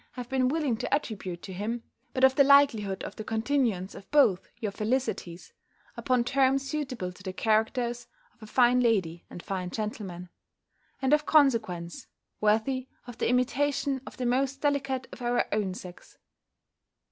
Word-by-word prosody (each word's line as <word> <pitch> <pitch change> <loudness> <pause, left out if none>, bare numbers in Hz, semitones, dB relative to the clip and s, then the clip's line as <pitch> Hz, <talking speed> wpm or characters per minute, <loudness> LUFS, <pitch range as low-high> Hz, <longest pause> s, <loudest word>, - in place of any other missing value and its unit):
have 250 -2 -6
been 260 -1 +2
willing 285 -3 0
to - - -5
attribute 190 - -2
to 190 - -7
him, 225 +5 -3 0.3
but 260 - -2
of 265 0 +7
the 280 - +5
likelihood 250 -9 +4
of - - -7
the 215 - -5
continuance 225 -4 0
of 195 - -12
both 270 -11 +3
your 215 -4 -2
felicities, 215 -5 -3 0.4
upon 250 -2 +1
terms 270 +2 +2
suitable 260 -10 -3
to 180 - -16
the 185 0 -5
characters 230 +4 0 0.3
of - - -34
a 215 - -10
fine 245 +2 +4
lady 190 -9 0
and 175 - -9
fine 185 -2 -3
gentleman: 190 -4 -5 0.7
and, 265 +2 +3
of 300 0 +3
consequence, 225 - +2 0.3
worthy 225 +5 +1 0.2
of 245 -1 -10
the - - +1
imitation 265 +2 +1
of - - -10
the 250 - -2
most 265 +2 0
delicate 275 -3 -1
of - - -11
our 240 0 +1
own 205 -3 0
sex. 180 -2 -11
240 Hz, 160 wpm, -28 LUFS, 205-265 Hz, 0.7 s, of